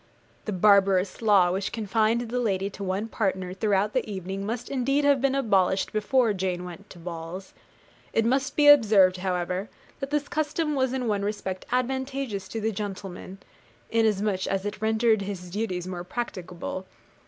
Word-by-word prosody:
The 215 - -2
barbarous 195 0 +3
law 200 -5 +5
which 190 +2 -2
confined 225 +1 +1
the 240 +1 -2
lady 200 -4 0
to 200 - -7
one 195 +3 -2
partner 190 -5 -2
throughout 205 +1 +1
the 255 -4 -1
evening 190 0 -4
must 235 +2 -3
indeed 275 +2 +1
have 280 -3 +4
been 275 0 +2
abolished 195 -7 +2
before 220 +2 +2
Jane 185 -2 -2
went 180 +3 -10
to - - -12
balls. 170 +2 -7 0.6
It 225 - +2
must 270 +4 +1
be 295 -1 +4
observed, 210 -10 +7
however, 180 +1 -2 0.3
that 275 - -4
this 295 0 -1
custom 310 0 -1
was 260 -2 +1
in 255 -2 -2
one 205 -2 0
respect 200 -2 -4
advantageous 260 -4 -2
to 225 - -4
the 220 +1 0
gentleman, 195 -2 -6 0.5
inasmuch 210 -4 +1
as 195 0 -1
it 205 0 -4
rendered 220 0 +2
his 190 -3 -6
duties 185 -3 -2
more 180 -1 -5
practicable. 185 -3 -5
205 Hz, 165 wpm, -26 LUFS, 190-235 Hz, 0.6 s, observed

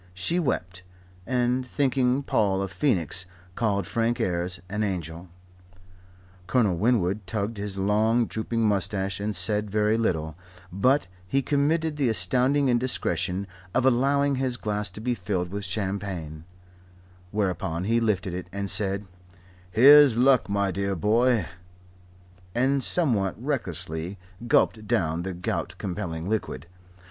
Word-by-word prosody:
She 165 - 0
wept, 90 - -2 0.5
and, 125 +1 +1
thinking 130 0 +1
Paul 100 -6 +1
a - - -2
phoenix, 90 - 0 0.3
called 100 -3 0
Frank 115 +4 0
Ayres 90 0 -1
an 105 +4 -3
angel. 85 -3 -4 1.2
Colonel 105 -5 +2
Winwood 100 -1 +1
tugged 110 +2 -3
his 100 -1 -4
long, 110 +4 +2
drooping 115 +1 -3
moustache 95 -1 0
and 105 0 -2
said 105 +4 0
very 105 +2 +1
little; 80 -8 -1 0.4
but 130 +8 +2 0.2
he 135 +8 +1
committed 150 +2 +1
the 135 -5 +2
astounding 125 +8 +2
indiscretion 100 -7 0 0.3
of 130 - +2
allowing 140 +2 +2
his 130 -2 -1
glass 105 -1 -2
to - - -9
be 125 +2 0
filled 90 -4 -2
with 100 0 -3
champagne; 95 -5 -4 0.8
whereupon 90 -4 -2
he 115 +4 +2
lifted 95 -5 0
it, 90 0 -5
and 100 0 -3
said, 100 0 -1 0.6
"Here's 135 +4 +7
luck, 130 -3 +4
my 100 -1 +1
dear 100 +1 -2
boy," 115 +3 +2 1.1
and 135 +2 +2
somewhat 115 - +1
recklessly 90 - -4 0.3
gulped 110 -1 +2
down 80 -2 0
the 95 +1 -4
gout 90 - -3
compelling 85 -2 -4
liquid. 100 -9 -3
105 Hz, 130 wpm, -26 LUFS, 90-125 Hz, 1.2 s, Here's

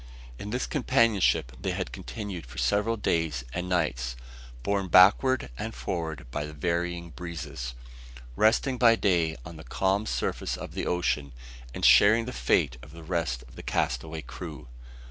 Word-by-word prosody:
In 105 - -6
this 125 +4 -1
companionship 115 - +2
they - - -1
had - - -3
continued 90 - -6
for 65 - -12
several 105 +3 +1
days 80 - 0
and 90 +1 -3
nights, 65 -9 0 0.5
borne 100 -1 0
backward 100 - +5
and - - -4
forward 80 +4 -4
by 75 +3 -2
the 75 +1 -7
varying 85 +2 -2
breezes; 75 -6 -6 0.6
resting 120 - +2
by 115 -2 +7
day 85 -7 +1
on 85 -1 -9
the 80 - -10
calm 95 +5 0
surface - - -2
of - - -8
the - - -3
ocean; 75 -6 0 0.4
and - - -2
sharing 110 +3 +7
the 125 - -5
fate 70 - +1
of 75 +4 -13
the 85 0 -11
rest 80 -8 -2
of - - -16
the - - -8
castaway 80 +6 -2
crew. 60 - -8
85 Hz, 160 wpm, -28 LUFS, 75-100 Hz, 0.6 s, by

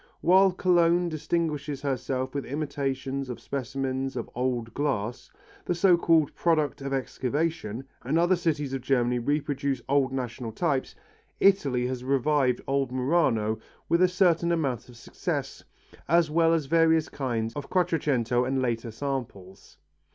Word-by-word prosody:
While 190 +2 +5
Cologne 175 -1 +3
distinguishes 155 -3 -2
herself 130 -1 -2
with 140 -1 -2
imitations 135 -2 -3
of 125 - -5
specimens 135 0 -3
of 120 - -5
old 120 -2 -2
glass, 125 -5 -2 0.4
the 175 - 0
so 175 +1 +5
called 165 -3 +3
product 155 -4 +1
of 135 0 -4
excavation, 135 -2 -2 0.2
and 140 +6 0
other 175 +2 +4
cities 150 -5 -1
of 135 - -2
Germany 125 -2 +1
reproduce 140 0 -1
old 140 -1 +2
national 120 -3 -4
types, 140 -2 -1 0.4
Italy 140 -11 +3
has 125 0 -3
revived 135 -1 +1
old 135 -2 0
Murano 125 -6 +1 0.3
with 170 +1 +3
a 185 - +6
certain 175 -2 +2
amount 135 -8 -1
of 120 - -14
success, 115 - -4 0.4
as 170 -2 +3
well 165 +1 +3
as 165 -3 +1
various 160 +1 +3
kinds 115 -5 -3
of 145 -1 -6
Quattrocento 135 -9 +1
and 130 +1 0
later 120 -2 -1
samples. 110 -7 -6
140 Hz, 140 wpm, -27 LUFS, 125-160 Hz, 0.4 s, a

